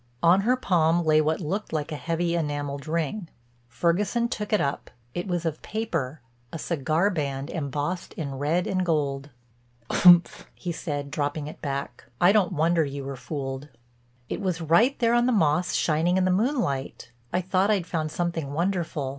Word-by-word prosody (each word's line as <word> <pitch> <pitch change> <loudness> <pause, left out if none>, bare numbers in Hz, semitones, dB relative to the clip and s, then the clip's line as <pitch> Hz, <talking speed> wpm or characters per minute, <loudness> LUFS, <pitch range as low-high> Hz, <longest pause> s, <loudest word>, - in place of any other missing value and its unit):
On 175 +3 +6
her 245 +5 +3
palm 170 -6 +2
lay 155 0 +5
what 155 +1 0
looked 195 +7 -3
like 155 0 -2
a - - -2
heavy 170 +2 -1
enameled 145 -2 -3
ring. 165 +3 -2 0.4
Ferguson 175 - +1
took 210 -3 -4
it 210 - +3
up; 140 - -2 0.2
it 175 +2 -3
was 175 -2 -2
of 155 -2 -2
paper, 165 - -3 0.3
a - - -5
cigar 160 +5 0
band 140 -4 -3
embossed 150 +3 -3
in 140 -4 -4
red 160 +5 +1
and 185 -1 0
gold. 145 -4 -1 0.7
"Umph," 180 +3 +6
he 175 - -4
said, 145 -4 -4
dropping 145 0 -2
it 150 - -9
back, 140 -4 -4
"I 175 - +6
don't 200 -3 +2
wonder 165 +1 +2
you 140 -1 -5
were 135 0 -5
fooled." 135 +1 -5 0.6
"It - - -4
was 185 -3 -1
right 170 - +3
there 235 -1 +2
on 240 +1 +3
the - - +3
moss 180 -4 +2
shining 165 +3 +2
in 185 - +2
the 185 - +2
moonlight. 185 - -1 0.2
I 180 - +1
thought 185 +2 +1
I'd 200 -5 +2
found 160 -3 -2
something 165 -5 -2
wonderful." 170 -4 -1
165 Hz, 175 wpm, -26 LUFS, 145-185 Hz, 0.7 s, On